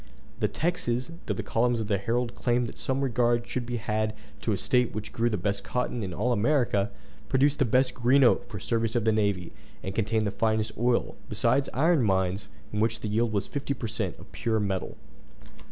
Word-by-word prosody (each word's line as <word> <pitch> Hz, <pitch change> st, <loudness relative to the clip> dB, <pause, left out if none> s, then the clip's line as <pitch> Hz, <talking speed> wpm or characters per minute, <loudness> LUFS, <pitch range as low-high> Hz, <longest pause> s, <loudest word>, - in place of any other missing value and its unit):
The -, -, +2 dB
Texans, 165 Hz, -5 st, -1 dB, 0.2 s
through -, -, 0 dB
the -, -, -3 dB
columns 120 Hz, +1 st, +1 dB
of 110 Hz, -, -2 dB
the 100 Hz, -3 st, +1 dB
Herald 120 Hz, +3 st, -1 dB
claimed 120 Hz, 0 st, +1 dB
that 115 Hz, -, -8 dB
some 135 Hz, +1 st, -1 dB
regard 120 Hz, -2 st, +2 dB
should 125 Hz, -1 st, -3 dB
be 120 Hz, -1 st, -2 dB
had 110 Hz, -1 st, -1 dB, 0.3 s
to 115 Hz, -, -1 dB
a 100 Hz, -, +1 dB
State 125 Hz, +4 st, +1 dB
which 110 Hz, 0 st, -5 dB
grew 115 Hz, +1 st, +1 dB
the 105 Hz, -, -1 dB
best 100 Hz, +2 st, -1 dB
cotton 125 Hz, -1 st, -2 dB
in 95 Hz, -3 st, -3 dB
all 110 Hz, +8 st, 0 dB
America, 115 Hz, -3 st, +2 dB, 0.4 s
produced 140 Hz, +2 st, +3 dB
the 135 Hz, -, +4 dB
best 125 Hz, +3 st, +3 dB
green 130 Hz, +3 st, +4 dB
oak 120 Hz, 0 st, +3 dB
for 105 Hz, -, -6 dB
the 95 Hz, -, -8 dB
service 115 Hz, -1 st, 0 dB
of 115 Hz, -2 st, +1 dB
the 110 Hz, -, +4 dB
navy, 100 Hz, -5 st, 0 dB, 0.3 s
and 95 Hz, -, -4 dB
contained 110 Hz, +1 st, +1 dB
the 100 Hz, -, 0 dB
finest 110 Hz, 0 st, 0 dB
oil, 120 Hz, +1 st, +1 dB, 0.2 s
besides 140 Hz, +1 st, +2 dB
iron 160 Hz, +3 st, +3 dB
mines, 95 Hz, -2 st, +1 dB, 0.3 s
in 105 Hz, -, -1 dB
which 110 Hz, 0 st, +1 dB
the 105 Hz, -, -3 dB
yield 115 Hz, +2 st, +1 dB
was 100 Hz, -2 st, 0 dB
fifty 140 Hz, 0 st, -3 dB
per 120 Hz, -, -5 dB
cent. 105 Hz, -5 st, -2 dB
of -, -, -14 dB
pure 110 Hz, -1 st, 0 dB
metal. 100 Hz, -2 st, -2 dB
115 Hz, 215 wpm, -28 LUFS, 105-125 Hz, 0.4 s, the